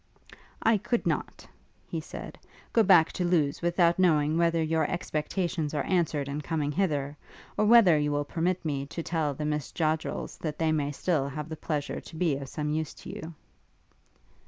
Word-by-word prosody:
'I 225 Hz, -1 st, +4 dB
could 240 Hz, +4 st, -1 dB
not,' -, -, -2 dB, 0.4 s
he -, -, -3 dB
said, -, -, -9 dB, 0.3 s
'go 230 Hz, -, +5 dB
back 185 Hz, -6 st, +6 dB
to 180 Hz, -, -2 dB
Lewes 165 Hz, -5 st, +1 dB
without 175 Hz, 0 st, +2 dB
knowing 155 Hz, -4 st, +3 dB
whether 165 Hz, -1 st, +2 dB
your 160 Hz, 0 st, +1 dB
expectations 160 Hz, -1 st, -2 dB
are 145 Hz, -, 0 dB
answered 160 Hz, -6 st, 0 dB
in 145 Hz, +2 st, -3 dB
coming 150 Hz, -1 st, -1 dB
hither; 150 Hz, -5 st, -1 dB, 0.4 s
or 210 Hz, -, +2 dB
whether 210 Hz, -8 st, +7 dB
you 150 Hz, 0 st, 0 dB
will 145 Hz, 0 st, 0 dB
permit 175 Hz, +4 st, -1 dB
me 140 Hz, -2 st, -2 dB
to 165 Hz, +3 st, -5 dB
tell 160 Hz, -4 st, -1 dB
the 150 Hz, -, -4 dB
Miss 150 Hz, -2 st, -2 dB
Joddrels 155 Hz, -1 st, -2 dB
that 150 Hz, -2 st, -4 dB
they 160 Hz, -1 st, +1 dB
may 145 Hz, -2 st, 0 dB
still 145 Hz, -2 st, 0 dB
have 150 Hz, +2 st, -6 dB
the 160 Hz, -, -4 dB
pleasure 150 Hz, -2 st, -3 dB
to -, -, -12 dB
be 160 Hz, -3 st, +1 dB
of 135 Hz, -1 st, -7 dB
some 150 Hz, +1 st, -3 dB
use 155 Hz, 0 st, -2 dB
to -, -, -9 dB
you.' 160 Hz, +1 st, -8 dB
155 Hz, 180 wpm, -28 LUFS, 150-170 Hz, 0.4 s, whether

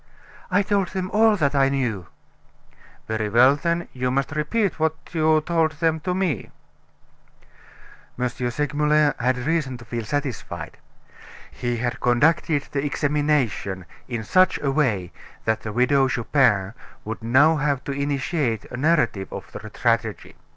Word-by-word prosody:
"I 200 Hz, +2 st, +3 dB
told 200 Hz, -2 st, +1 dB
them 185 Hz, -1 st, -4 dB
all 220 Hz, 0 st, +4 dB
that 150 Hz, -7 st, +1 dB
I 135 Hz, -1 st, +3 dB
knew." 120 Hz, -10 st, -2 dB, 1.0 s
"Very 110 Hz, -1 st, -2 dB
well, 125 Hz, +6 st, +6 dB
then, 170 Hz, +3 st, -1 dB
you 125 Hz, 0 st, -1 dB
must 135 Hz, +2 st, -1 dB
repeat 160 Hz, +6 st, -1 dB
what 160 Hz, 0 st, +1 dB, 0.2 s
you 155 Hz, -1 st, +3 dB
told 160 Hz, -1 st, +1 dB
them 160 Hz, +1 st, 0 dB
to 180 Hz, +3 st, -2 dB
me." 185 Hz, -5 st, -1 dB, 1.7 s
M. 125 Hz, 0 st, 0 dB
Segmuller 150 Hz, +4 st, +1 dB
had 125 Hz, +1 st, +1 dB
reason 140 Hz, -1 st, -1 dB
to 120 Hz, -, -13 dB
feel 115 Hz, 0 st, -4 dB
satisfied. 135 Hz, +1 st, -4 dB, 0.7 s
He 120 Hz, -1 st, -3 dB
had 120 Hz, +1 st, -2 dB
conducted 145 Hz, +4 st, +2 dB
the 140 Hz, -1 st, -1 dB
examination 145 Hz, -, 0 dB, 0.2 s
in 115 Hz, -3 st, -4 dB
such 185 Hz, -, +3 dB
a 140 Hz, -, +1 dB
way 110 Hz, -, 0 dB, 0.3 s
that 110 Hz, 0 st, 0 dB
the 110 Hz, -, -5 dB
Widow 130 Hz, +4 st, +3 dB
Chupin 115 Hz, -6 st, +1 dB, 0.3 s
would 110 Hz, +1 st, -5 dB
now 140 Hz, +8 st, +4 dB
have 145 Hz, -2 st, 0 dB
to -, -, -4 dB
initiate 140 Hz, -3 st, -1 dB
a 125 Hz, -, -5 dB
narrative 125 Hz, -10 st, +1 dB
of -, -, -8 dB
the 110 Hz, -, -8 dB
tragedy. 115 Hz, -3 st, -1 dB
140 Hz, 145 wpm, -23 LUFS, 120-155 Hz, 1.7 s, well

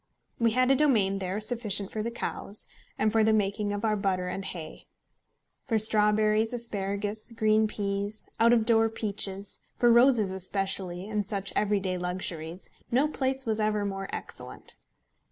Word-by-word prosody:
We 230 Hz, -2 st, +3 dB
had 255 Hz, +2 st, +3 dB
a -, -, +5 dB
domain 215 Hz, -9 st, +2 dB
there 190 Hz, +2 st, -3 dB
sufficient 215 Hz, -3 st, 0 dB
for 215 Hz, -, -3 dB
the 230 Hz, -, -2 dB
cows, 215 Hz, -3 st, -3 dB, 0.3 s
and 215 Hz, -, +1 dB
for 220 Hz, 0 st, +3 dB
the 220 Hz, -, +4 dB
making 205 Hz, 0 st, 0 dB
of 205 Hz, +2 st, -3 dB
our 215 Hz, -1 st, +2 dB
butter 190 Hz, -3 st, -1 dB
and 195 Hz, +1 st, -4 dB
hay. 165 Hz, -5 st, -7 dB, 0.8 s
For 225 Hz, -4 st, +2 dB
strawberries, 215 Hz, +1 st, +3 dB
asparagus, 205 Hz, -2 st, -2 dB
green 220 Hz, -1 st, +2 dB
peas, 205 Hz, 0 st, -3 dB
out 230 Hz, +1 st, +5 dB
of 230 Hz, -2 st, +3 dB
door 225 Hz, -1 st, +4 dB
peaches, 200 Hz, -2 st, -2 dB, 0.2 s
for 240 Hz, -1 st, +4 dB
roses 235 Hz, -4 st, +4 dB
especially, 190 Hz, -1 st, -2 dB
and 210 Hz, -1 st, -1 dB
such 200 Hz, -1 st, -2 dB
everyday 195 Hz, -3 st, 0 dB
luxuries, 180 Hz, -1 st, -5 dB, 0.2 s
no 265 Hz, +5 st, +3 dB
place 265 Hz, -2 st, +1 dB
was 220 Hz, -1 st, -1 dB
ever 210 Hz, -1 st, 0 dB
more 195 Hz, -1 st, -4 dB
excellent. -, -, -7 dB
210 Hz, 155 wpm, -28 LUFS, 195-225 Hz, 0.8 s, a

